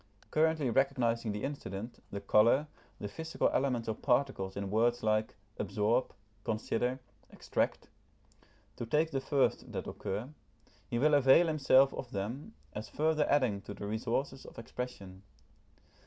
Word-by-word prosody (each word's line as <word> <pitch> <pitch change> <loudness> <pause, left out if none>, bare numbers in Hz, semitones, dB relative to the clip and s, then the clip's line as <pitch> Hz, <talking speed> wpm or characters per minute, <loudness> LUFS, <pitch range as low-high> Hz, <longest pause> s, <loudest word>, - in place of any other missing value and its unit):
Currently 155 -4 +2
recognising 120 -4 +1
the 105 +1 -4
incident, 115 -5 -5
the 100 - -5
colour, 115 +8 +4 0.3
the 105 - -4
physical 160 +10 -1
elements 125 -3 0
or 110 - 0
particles 120 -6 0
in 100 -1 -3
words 120 +3 +2
like 110 0 +1 0.2
absorb, 115 +4 +1 0.3
consider, 115 +3 -1 0.3
extract, - - -2 0.9
to 115 - -5
take 155 +6 +2
the 135 -2 -1
first 135 0 +1
that - - -4
occur, 105 +6 -4 0.6
he 120 - -1
will 150 +5 +3
avail 145 +4 +6
himself 140 -4 +4
of 125 - -6
them, 120 - -5 0.2
as 105 +1 -6
further 155 0 +1
adding 125 -9 +2
to 100 - -8
the - - -6
resources 120 +5 -2
of - - -13
expression. 110 -5 -7
120 Hz, 140 wpm, -32 LUFS, 110-140 Hz, 0.9 s, avail